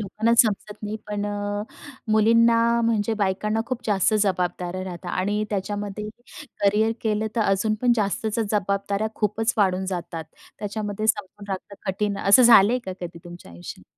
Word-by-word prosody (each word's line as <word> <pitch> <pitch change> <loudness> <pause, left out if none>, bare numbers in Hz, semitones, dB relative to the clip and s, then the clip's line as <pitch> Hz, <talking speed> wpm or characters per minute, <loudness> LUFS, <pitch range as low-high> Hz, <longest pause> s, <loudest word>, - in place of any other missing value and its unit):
लोकांना 215 +3 0
समजत 210 -1 -3
नाही 210 +1 -3
पण 205 0 -3
अ, 205 0 -3 0.5
मुलींना 230 +1 +5 0.2
म्हणजे 225 -1 +1
बायकांना 210 +2 0
खूप 255 -2 -3
जास्त 205 0 +2
जबाबदाऱ्या 180 -1 -1
राहतात 175 -1 -6
आणि 205 +3 -1
त्याच्यामध्ये 205 +1 -3 0.5
करिअर 215 +3 +3
केलं 215 -1 0
तर - - +2
अजून 205 +2 +1
पण 245 -1 +4
जास्तच 215 +1 -1
जबाबदाऱ्या 200 +1 -1
खूपच 220 +2 0
वाढून 190 -2 +2
जातात. 170 -3 -4 0.3
त्याच्यामध्ये 210 0 -3
समजून 205 -1 -1
राहतं 195 +1 -5
कठीण 200 +1 -1
असं 200 +6 +6
झालंय 235 0 +7
का 185 - -3
कधी 170 -1 -7
तुमच्या 175 - -11
आयुष्यात? 85 +1 -10
205 Hz, 145 wpm, -24 LUFS, 190-215 Hz, 0.5 s, झालंय